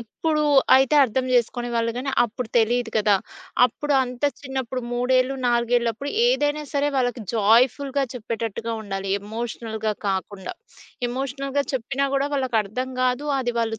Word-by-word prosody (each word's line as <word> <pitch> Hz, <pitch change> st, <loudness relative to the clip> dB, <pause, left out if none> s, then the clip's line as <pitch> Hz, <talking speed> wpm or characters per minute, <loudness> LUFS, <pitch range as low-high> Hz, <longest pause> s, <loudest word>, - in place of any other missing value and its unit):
ఇప్పుడు 305 Hz, +7 st, -1 dB, 0.3 s
అయితే 265 Hz, +2 st, +4 dB
అర్థం 255 Hz, +2 st, -1 dB
జేసుకునే 240 Hz, 0 st, +1 dB
వాళ్ళు 230 Hz, 0 st, 0 dB
గానీ, 265 Hz, +2 st, -2 dB
అప్పుడు 235 Hz, 0 st, -5 dB
తెలీదు 235 Hz, +1 st, +2 dB
గదా! 210 Hz, -1 st, +4 dB, 0.5 s
అప్పుడు 290 Hz, +4 st, -1 dB
అంత 250 Hz, +1 st, -4 dB, 0.2 s
చిన్నప్పుడు 260 Hz, -2 st, -4 dB
3ఏళ్ళు, 255 Hz, +2 st, +2 dB
నాలుగేళ్లప్పుడు 240 Hz, +2 st, +1 dB, 0.2 s
ఏదైనా 300 Hz, -11 st, +1 dB
సరే 285 Hz, 0 st, +1 dB
వాళ్ళకి 245 Hz, -2 st, 0 dB
జాయ్‌ఫుల్‌గా 255 Hz, +6 st, +3 dB
చెప్పేటట్టుగా 230 Hz, -1 st, -4 dB
ఉండాలి, 195 Hz, -1 st, -4 dB
ఎమోషనల్‌గా 220 Hz, 0 st, -4 dB, 0.2 s
కాకుండా. 190 Hz, 0 st, -3 dB, 0.6 s
ఎమోషనల్‌గా 275 Hz, +2 st, -2 dB
చెప్పినా 270 Hz, +2 st, -1 dB
గూడా 275 Hz, +1 st, +1 dB
వాళ్ళకర్థం 255 Hz, -1 st, -1 dB
గాదు. 255 Hz, +3 st, 0 dB
అది 240 Hz, -2 st, -2 dB
వాళ్ళు 225 Hz, -1 st, -2 dB
245 Hz, 125 wpm, -23 LUFS, 225-270 Hz, 0.6 s, అయితే